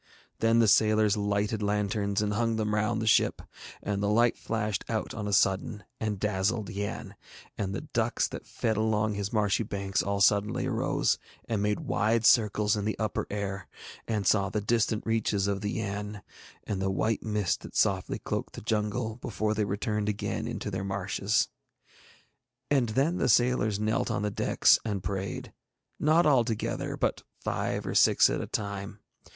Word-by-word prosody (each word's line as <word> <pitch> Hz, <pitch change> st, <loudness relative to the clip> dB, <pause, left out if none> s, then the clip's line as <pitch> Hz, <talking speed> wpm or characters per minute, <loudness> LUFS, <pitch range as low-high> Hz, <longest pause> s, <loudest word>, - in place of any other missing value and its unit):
Then 115 Hz, 0 st, +3 dB
the 115 Hz, -1 st, +5 dB
sailors 110 Hz, 0 st, +4 dB
lighted 105 Hz, +1 st, -1 dB
lanterns 105 Hz, 0 st, 0 dB
and 105 Hz, 0 st, -1 dB
hung 115 Hz, +1 st, +1 dB
them 105 Hz, -1 st, -1 dB
round 105 Hz, +1 st, +1 dB
the 110 Hz, -, -2 dB
ship, 110 Hz, -, +3 dB, 0.4 s
and 100 Hz, -1 st, -2 dB
the 100 Hz, -, +1 dB
light 115 Hz, +3 st, +3 dB
flashed 105 Hz, -3 st, -2 dB
out 110 Hz, -2 st, -2 dB
on 105 Hz, -2 st, -4 dB
a -, -, -2 dB
sudden 95 Hz, +2 st, +1 dB, 0.2 s
and 105 Hz, -3 st, -2 dB
dazzled 105 Hz, +2 st, 0 dB
Yann, 100 Hz, -1 st, -4 dB, 0.4 s
and 100 Hz, -2 st, -3 dB
the -, -, -3 dB
ducks -, -, 0 dB
that -, -, -8 dB
fed 110 Hz, -2 st, -1 dB
along 110 Hz, -1 st, +1 dB
his 100 Hz, -1 st, -3 dB
marshy 105 Hz, -1 st, +1 dB
banks 100 Hz, -3 st, -1 dB
all 100 Hz, 0 st, -1 dB
suddenly 105 Hz, +5 st, +3 dB
arose, 130 Hz, -4 st, +1 dB, 0.3 s
and 110 Hz, -3 st, -1 dB
made 105 Hz, 0 st, 0 dB
wide 115 Hz, +1 st, +1 dB
circles 105 Hz, -2 st, +4 dB
in 105 Hz, -, -2 dB
the 110 Hz, +1 st, -2 dB
upper 110 Hz, -1 st, -2 dB
air, 100 Hz, -3 st, -4 dB, 0.4 s
and 105 Hz, -3 st, -1 dB
saw 100 Hz, 0 st, +3 dB
the 105 Hz, -, -1 dB
distant 110 Hz, 0 st, 0 dB
reaches 110 Hz, -3 st, +1 dB
of 100 Hz, -1 st, -1 dB
the 105 Hz, -1 st, -2 dB
Yann 105 Hz, -1 st, -4 dB, 0.4 s
and 100 Hz, -2 st, -3 dB
the 95 Hz, -, 0 dB
white 110 Hz, +3 st, 0 dB
mist 105 Hz, -4 st, -1 dB
that -, -, -11 dB
softly 95 Hz, -1 st, +1 dB
cloaked -, -, -4 dB
the -, -, -7 dB
jungle, 110 Hz, +1 st, -1 dB
before 110 Hz, -3 st, -2 dB
they 105 Hz, -1 st, 0 dB
returned 105 Hz, +1 st, -1 dB
again 105 Hz, 0 st, -2 dB
into 105 Hz, -, -4 dB
their 95 Hz, 0 st, -3 dB
marshes. 100 Hz, +1 st, 0 dB, 1.2 s
And 130 Hz, -5 st, +3 dB
then 140 Hz, +10 st, +1 dB
the -, -, +2 dB
sailors 120 Hz, -4 st, +3 dB
knelt 110 Hz, +1 st, 0 dB
on -, -, -1 dB
the 105 Hz, -, -1 dB
decks -, -, +4 dB
and 100 Hz, -4 st, -3 dB
prayed, 95 Hz, +1 st, -4 dB, 0.5 s
not 160 Hz, +3 st, +4 dB
all 135 Hz, -5 st, +5 dB
together, 115 Hz, -2 st, -3 dB
but -, -, 0 dB, 0.2 s
five -, -, -2 dB
or -, -, -3 dB
six -, -, +5 dB
at -, -, -1 dB
a -, -, -5 dB
time. 100 Hz, -1 st, -4 dB
105 Hz, 175 wpm, -28 LUFS, 100-110 Hz, 1.2 s, the